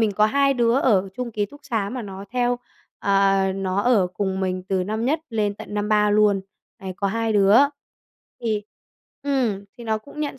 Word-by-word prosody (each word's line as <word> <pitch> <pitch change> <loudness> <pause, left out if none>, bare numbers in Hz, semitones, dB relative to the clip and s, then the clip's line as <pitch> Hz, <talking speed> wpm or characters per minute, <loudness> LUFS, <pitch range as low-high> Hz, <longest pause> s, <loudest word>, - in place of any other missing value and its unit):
mình 215 -2 +2
có 210 +2 +4
hai 275 +4 +2
đứa 235 -2 +2
ở 195 -6 +3
chung 250 -1 -3
ký 205 -1 -1
túc 290 +7 -15
xá 225 -7 -1
mà 250 -1 -4
nó 195 -1 -8
theo, 245 0 0 0.4
ờ, 195 0 +3 0.2
nó 190 0 -1
ở 220 -6 +3
cùng 190 +1 -3
mình 185 -1 -1
từ 190 -2 0
năm 215 +3 -2
nhất 310 +5 +1
lên 210 -3 0
tận 205 - -9
năm 210 0 -1
3 210 -1 +3
luôn. 205 -1 +4 0.4
Đấy, 190 -1 -6
có 200 - -1
2 225 +2 -1
đứa 205 +1 +5 0.8
thì 220 -3 -1 0.6
ừm, 250 -8 0
thì 235 - -9
nó 220 -1 0
cũng 285 +7 -11
nhận 285 -3 -3
210 Hz, 200 wpm, -23 LUFS, 195-240 Hz, 0.8 s, đứa